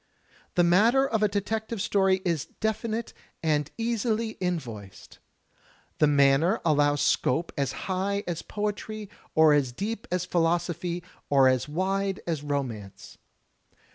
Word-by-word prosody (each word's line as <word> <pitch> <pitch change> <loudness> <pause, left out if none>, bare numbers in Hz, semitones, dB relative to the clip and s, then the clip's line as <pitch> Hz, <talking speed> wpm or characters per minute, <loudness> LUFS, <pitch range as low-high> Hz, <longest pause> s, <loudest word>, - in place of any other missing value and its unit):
The 175 - +4
matter 225 +10 +4
of 220 -4 -1
a 210 - +5
detective 220 +2 -3
story 190 -1 +2
is 170 -5 0
definite 220 +1 -2 0.3
and 150 -3 +1
easily 230 -1 0
invoiced; 120 - -5 0.8
the 150 - +5
manner 145 +7 +4
allows 145 -2 +3
scope 160 +7 +1
as 140 -3 -1
high 195 +2 -1
as 170 -2 -3
poetry 210 0 -4 0.3
or 160 -1 +6
as 140 -4 +2
deep 210 - -4
as 180 -1 0
philosophy 175 0 0 0.3
or 135 -2 +5
as 130 +2 +1
wide 195 +4 -1
as 160 -4 -2
romance. 130 -9 -5
175 Hz, 125 wpm, -27 LUFS, 145-210 Hz, 0.8 s, or